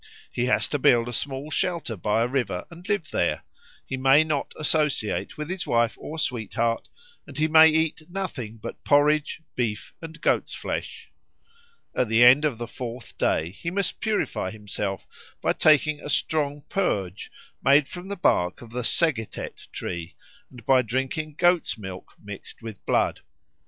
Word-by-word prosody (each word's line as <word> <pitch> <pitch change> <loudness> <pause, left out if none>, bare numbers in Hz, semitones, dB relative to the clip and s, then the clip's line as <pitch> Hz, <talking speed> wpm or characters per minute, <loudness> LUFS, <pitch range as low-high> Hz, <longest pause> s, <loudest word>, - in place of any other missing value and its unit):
He 120 - 0
has - - +2
to 145 - -1
build 120 -2 +4
a 120 - -5
small 140 +4 -3
shelter 170 -7 -1
by 105 +4 +1
a - - +1
river 120 -9 -2
and 175 +4 -12
live 205 -6 -1
there; 85 - 0 0.4
he 130 - -4
may 135 +3 +5
not 155 -3 -2
associate 150 -7 0
with 150 0 -4
his 185 +1 -3
wife 115 -1 +2
or 160 - -7
sweetheart, 115 -4 -1 0.4
and - - -10
he 155 +1 +3
may 160 0 +8
eat 160 0 0
nothing 165 - -5
but 110 - -8
porridge, 150 +2 +3
beef, 115 -4 -3
and 165 0 -9
goat's - - +1
flesh. - - -5 0.8
At 125 - +1
the 115 +2 +5
end 130 +5 +7
of 140 -6 0
the 120 0 -5
fourth 120 0 -7
day 80 +2 +1
he 135 - -5
must 195 0 -2
purify 210 - -1
himself 100 -1 -4 0.3
by - - +1
taking 155 0 +4
a - - -7
strong 145 -1 0
purge 100 - -2 0.3
made 140 +1 +5
from 180 +1 -8
the 200 - -4
bark 90 - +1
of 115 - -13
the 125 +1 -3
segetet 120 -3 -1
tree 85 -1 -5 0.3
and 120 -4 -14
by 130 -1 +5
drinking 135 +6 -2
goat's 175 -6 +3
milk 95 -3 -9
mixed 105 +2 -9
with 110 -4 -8
blood. - - +2
135 Hz, 165 wpm, -25 LUFS, 115-155 Hz, 0.8 s, may